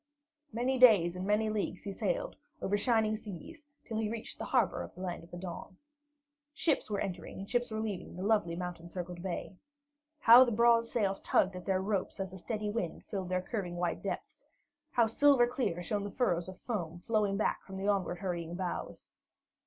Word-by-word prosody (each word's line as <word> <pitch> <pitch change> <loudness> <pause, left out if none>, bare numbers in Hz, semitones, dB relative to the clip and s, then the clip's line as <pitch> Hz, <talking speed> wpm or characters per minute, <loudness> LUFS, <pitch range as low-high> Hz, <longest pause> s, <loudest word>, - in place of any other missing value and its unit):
Many 250 +3 0
days 200 -9 +7
and 185 +1 -4
many 215 +1 +2
leagues 205 -3 -2
he 200 - -4
sailed, - - -2 0.2
over 200 - 0
shining 220 0 +2
seas, 220 - -9 0.2
till 225 - -4
he 215 -1 0
reached 225 0 -6
the - - -3
harbor - - +2
of - - -8
the 185 - -9
Land 180 -3 -4
of 170 - -15
the 175 - -8
Dawn. 180 +1 -7 0.8
Ships 305 -8 +1
were 205 -2 -1
entering 180 -3 -4
and 195 - -6
ships 245 +1 0
were 220 -1 -3
leaving 210 -6 -4
the 180 - -5
lovely 205 -5 +2
mountain 175 -1 -5
circled 175 0 -6
bay. 185 0 -4 0.6
How 235 +3 +10
the 245 - 0
broad 235 +1 +5
sails 200 -5 0
tugged 190 0 +2
at 180 - -8
their 190 -1 +1
ropes 200 -1 -2
as 190 -1 -4
a 190 - -8
steady 210 +2 -3
wind 190 -7 -3
filled 190 -3 -3
their 185 0 0
curving 185 -5 -3
white 175 -1 -1
depths! - - -5 0.4
How 240 -5 +3
silver 260 +2 +5
clear 215 -8 -2
shone 205 +4 -1
the 205 - -4
furrows 185 -6 0
of 185 - -9
foam 175 -8 -4
flowing 205 +1 0
back 215 - 0
from 190 -1 -9
the 195 +1 -2
onward 195 -3 +1
hurrying 175 -2 -3
bows! 180 -1 -5
200 Hz, 200 wpm, -32 LUFS, 180-225 Hz, 0.8 s, How